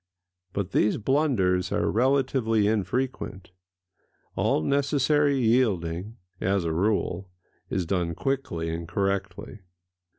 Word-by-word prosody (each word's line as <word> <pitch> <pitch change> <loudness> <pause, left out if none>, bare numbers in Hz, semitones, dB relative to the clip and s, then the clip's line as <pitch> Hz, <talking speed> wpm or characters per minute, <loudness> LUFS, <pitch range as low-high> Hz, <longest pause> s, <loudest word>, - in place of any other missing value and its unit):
But 100 -2 -3
these 105 - +2
blunders 110 - +1
are - - +1
relatively 125 -3 +2
infrequent: 105 -3 -2 0.8
all 75 - +1
necessary 140 - +2
yielding, 110 -5 +1 0.2
as 95 -1 0
a 80 - -1
rule, 95 0 0 0.4
is 95 -2 -1
done 85 -2 -1
quickly 130 - -2
and 85 0 -5
correctly. 100 +3 -2
100 Hz, 100 wpm, -26 LUFS, 90-130 Hz, 0.8 s, these